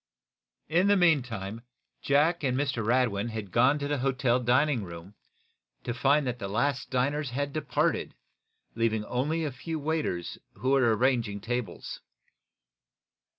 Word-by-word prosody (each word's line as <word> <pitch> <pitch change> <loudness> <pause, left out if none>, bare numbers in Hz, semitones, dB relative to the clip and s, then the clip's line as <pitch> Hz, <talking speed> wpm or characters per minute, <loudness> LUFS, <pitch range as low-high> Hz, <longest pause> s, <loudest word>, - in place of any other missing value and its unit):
In 175 +5 +3
the 205 0 +5
meantime 120 - +1 0.4
Jack 150 +5 +2
and 130 -2 +1
Mr. 135 -5 -1
Radwin 115 -2 +1
had 110 -4 -6
gone 125 +5 +4
to 145 -1 -3
the 145 -1 -1
hotel 130 -1 +1
dining 125 0 +2
room, 85 +2 -9 0.7
to 120 - -3
find 140 +4 +2
that 125 -1 -3
the 100 - -4
last 140 +8 -1
diners 140 +3 0
had 140 +3 -3
departed, 145 -5 -1 0.6
leaving 110 -2 0
only 150 +8 -1
a 145 - -2
few 160 +6 -5
waiters 150 - -2
who 130 - -1
were 120 -5 +4
arranging 120 -5 +1
tables. 115 -3 -4
125 Hz, 140 wpm, -28 LUFS, 115-145 Hz, 0.7 s, the